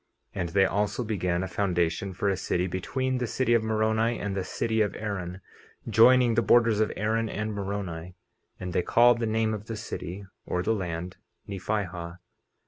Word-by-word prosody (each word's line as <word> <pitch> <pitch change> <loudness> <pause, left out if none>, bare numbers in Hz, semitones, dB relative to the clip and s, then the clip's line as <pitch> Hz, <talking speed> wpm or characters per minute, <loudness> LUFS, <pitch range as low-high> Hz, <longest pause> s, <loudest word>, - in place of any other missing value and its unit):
50:14 - - -6
And 85 - -2
they 95 +2 +4
also 105 +5 0
began 90 -5 -1
a - - -3
foundation 90 -1 0
for 95 +2 -2
a 100 - +2
city 90 -1 -1
between 130 +8 -2
the 125 - -1
city 125 0 +1
of 115 - +4
Moroni 110 +1 +1
and 100 -1 -3
the 95 - -1
city 110 +4 -1
of 105 - 0
Aaron, 95 -3 -4 0.5
joining 120 +2 +6
the 120 - +3
borders 115 0 +4
of 110 - +2
Aaron 110 +2 0
and 110 +1 -3
Moroni; 95 -4 -4 0.4
and 90 -1 -5
they - - +2
called 120 +4 +5
the 115 - 0
name 110 0 +1
of 105 0 -6
the 115 - -4
city, 100 -3 -6 0.2
or 90 - -2
the 110 - +2
land, 90 -3 -4 0.3
Nephihah. 90 -3 -3
100 Hz, 185 wpm, -27 LUFS, 90-110 Hz, 0.5 s, joining